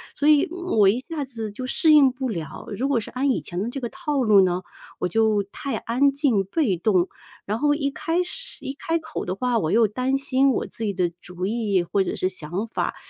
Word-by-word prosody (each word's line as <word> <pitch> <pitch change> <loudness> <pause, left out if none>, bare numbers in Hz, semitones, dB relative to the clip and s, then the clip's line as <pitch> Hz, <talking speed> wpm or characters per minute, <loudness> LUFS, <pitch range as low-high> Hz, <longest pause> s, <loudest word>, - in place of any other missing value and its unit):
所 295 - 0
以， 300 -2 +6
嗯， 360 0 -4
我 195 -2 +7
一 235 +5 +1
下 305 +1 -5
子 225 -5 -5
就 255 +5 -6
适 310 +4 +4
应 280 -3 +7
不 260 +1 -4
了。 165 - -6
如 270 +4 -1
果 250 -5 +2
是 210 - -6
按 270 +2 +1
以 - - 0
前 175 +1 -5
的 230 - -3
这 275 - -5
个 245 - -3
套 300 -6 -2
路 210 -4 +6
呢， 180 0 +1 0.4
我 - - 0
就 215 +1 +2
太 220 +4 -5
安 265 +5 +2
静、 275 -8 +1
被 205 - 0
动， 180 0 +2 0.4
然 210 +2 -1
后 295 0 +3
一 280 -2 0
开 330 +5 -1
始 - - -3
一 270 - -3
开 330 +1 -2
口 315 0 -6
的 180 - -3
话， 245 +2 0
我 155 - -1
又 225 0 +4
担 255 +6 0
心 270 0 +2
我 - - -1
自 225 - -7
己 205 -2 -1
的 180 -2 0
主 180 +1 -6
意 210 -4 0
或 195 +3 0
者 - - -3
是 185 - 0
想 185 +4 -4
法， - - -2
240 Hz, 255 characters per minute, -24 LUFS, 200-280 Hz, 0.4 s, 我